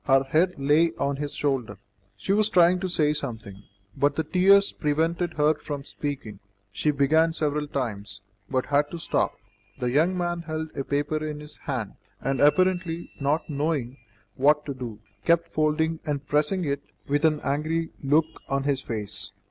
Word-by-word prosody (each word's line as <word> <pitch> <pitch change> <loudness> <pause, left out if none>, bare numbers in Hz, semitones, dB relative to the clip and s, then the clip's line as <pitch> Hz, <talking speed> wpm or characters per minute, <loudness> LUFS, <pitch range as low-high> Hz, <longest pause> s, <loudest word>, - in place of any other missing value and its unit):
Her 135 -1 +4
head 160 +7 +2
lay 150 +4 +3
on 140 0 -1
his 145 0 -3
shoulder. 130 -8 -1 0.4
She 190 - -1
was 215 +1 +3
trying 180 0 +5
to 185 0 -2
say 150 -4 +2
something, 110 -9 -5 0.3
but 140 +1 +2
the 160 - 0
tears 195 +3 +5
prevented 165 +3 0
her 150 +1 +4
from 145 -2 -6
speaking; 135 -9 -5 0.3
she 125 +9 0
began 155 +3 +3
several 150 -2 -1
times, 105 -8 -4 0.3
but 130 -1 0
had 145 +1 +2
to 170 - -6
stop. 165 - 0 0.4
The 125 -1 -1
young 165 +7 +2
man 175 -1 -1
held 160 -1 -5
a 140 - -2
paper 145 +2 -1
in 150 -1 -4
his 150 0 -10
hand, 115 -7 -3 0.2
and, 135 -1 -1
apparently 175 +2 +2
not 145 +3 0
knowing 145 -4 -2 0.4
what 150 +5 +3
to 140 - -3
do, 120 -5 -7 0.3
kept 170 0 +3
folding 155 +1 +1
and 145 -3 -3
pressing 155 +5 +1
it 140 -1 -1 0.3
with 145 +2 +1
an 155 -2 +3
angry 155 +4 -1
look 150 +3 +4 0.2
on 135 0 0
his 140 -2 0
face. 110 -5 -4
150 Hz, 170 wpm, -26 LUFS, 135-165 Hz, 0.4 s, trying